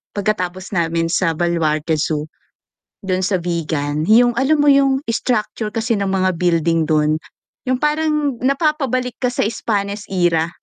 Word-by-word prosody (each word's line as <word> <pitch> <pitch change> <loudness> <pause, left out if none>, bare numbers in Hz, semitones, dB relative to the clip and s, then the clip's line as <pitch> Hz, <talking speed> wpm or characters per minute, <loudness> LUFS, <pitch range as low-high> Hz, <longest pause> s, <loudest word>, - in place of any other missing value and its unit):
pagkatapos 185 -3 -2
namin 165 0 0
sa 170 -1 +1
Baluarte 160 -2 0
Zoo. 155 0 -2 0.7
Dun 185 -1 -1
sa 190 0 +1
Vigan, 155 -3 -2
yung 240 +2 +5
alam 285 +4 +2
mo 290 - +3
yung 275 -1 +3
structure 220 -2 -1
kasi 230 0 -1
ng 200 -1 -1
mga 185 -1 +1
building 165 -2 +1
dun, 155 0 +2 0.5
yung 255 - +2
parang 300 -3 0
napapabalik 270 -3 0
ka 250 - +2
sa 245 - -1
Spanish 205 -2 -2
era. 175 -3 +1
195 Hz, 140 wpm, -19 LUFS, 165-250 Hz, 0.7 s, yung